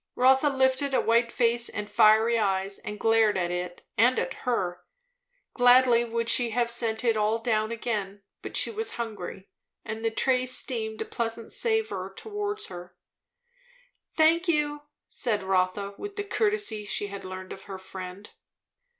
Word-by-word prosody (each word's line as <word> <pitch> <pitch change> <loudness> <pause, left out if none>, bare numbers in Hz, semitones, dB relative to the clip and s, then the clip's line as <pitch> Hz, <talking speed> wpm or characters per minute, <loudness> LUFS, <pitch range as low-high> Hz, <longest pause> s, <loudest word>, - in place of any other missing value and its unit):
Rotha 265 +3 +4
lifted 265 0 +1
a - - +4
white 235 +1 +2
face 235 0 +2
and 210 0 -5
fiery 220 +3 +4
eyes, 195 -1 -1
and 210 0 -7
glared 225 -2 +3
at 175 -1 -1
it 180 0 -5
and 245 +3 +5
at 265 - -1 0.2
her. 180 -7 -1 0.7
Gladly 245 -1 +5
would 230 0 -2
she 235 +1 +4
have 235 +1 0
sent 230 -1 -2
it 230 -2 +2
all 215 +1 +1
down 220 -1 0
again; 205 -4 -4 0.2
but - - -4
she - - +4
was 445 0 -3
hungry, 205 -4 -6 0.4
and 220 0 -5
the 225 - +2
tray 255 +2 +1
steamed 225 -4 -1
a - - -14
pleasant 230 -1 -4
savour 445 -1 -1
towards 415 -1 -4
her. 175 0 -10 1.2
"Thank 330 +3 +4
you," 295 -2 +1 0.3
said 215 -6 -1
Rotha, 190 +1 0
with 410 0 -7
the 410 - -3
courtesy 410 - -1
she 205 0 -2
had 200 -1 -7
learned 185 0 -7
of 195 - -12
her 195 -1 -7
friend. 190 +1 -9
230 Hz, 160 wpm, -27 LUFS, 205-255 Hz, 1.2 s, and